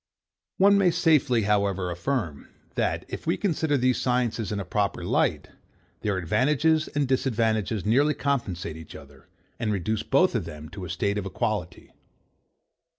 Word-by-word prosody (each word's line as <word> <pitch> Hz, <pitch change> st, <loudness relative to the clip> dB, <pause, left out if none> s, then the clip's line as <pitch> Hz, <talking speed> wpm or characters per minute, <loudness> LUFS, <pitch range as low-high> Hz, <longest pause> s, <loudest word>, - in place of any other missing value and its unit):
One 200 Hz, +1 st, +5 dB
may 190 Hz, -2 st, +4 dB
safely, 140 Hz, -8 st, +3 dB
however, 100 Hz, -3 st, +1 dB
affirm, 85 Hz, -, -3 dB, 0.3 s
that, -, -, -1 dB
if -, -, -7 dB
we -, -, +2 dB
consider 160 Hz, -6 st, 0 dB
these 130 Hz, 0 st, +1 dB
sciences 120 Hz, -4 st, 0 dB
in 105 Hz, -, -2 dB
a 100 Hz, -, -4 dB
proper 100 Hz, +3 st, -1 dB
light, -, -, 0 dB, 0.5 s
their 100 Hz, -3 st, -1 dB
advantages 150 Hz, -, +2 dB
and 145 Hz, -2 st, -1 dB
disadvantages 110 Hz, -6 st, 0 dB
nearly 140 Hz, +7 st, +3 dB
compensate 95 Hz, -, -2 dB
each 80 Hz, -1 st, -11 dB
other, 70 Hz, -1 st, -14 dB, 0.3 s
and 110 Hz, -2 st, -1 dB
reduce 105 Hz, +2 st, -1 dB
both 185 Hz, 0 st, +3 dB
of 115 Hz, -8 st, -1 dB
them 75 Hz, -1 st, -9 dB
to 95 Hz, -2 st, -7 dB
a -, -, -8 dB
state 100 Hz, +4 st, -1 dB
of 100 Hz, -, -4 dB
equality. 95 Hz, -, -3 dB
110 Hz, 150 wpm, -26 LUFS, 95-140 Hz, 0.5 s, One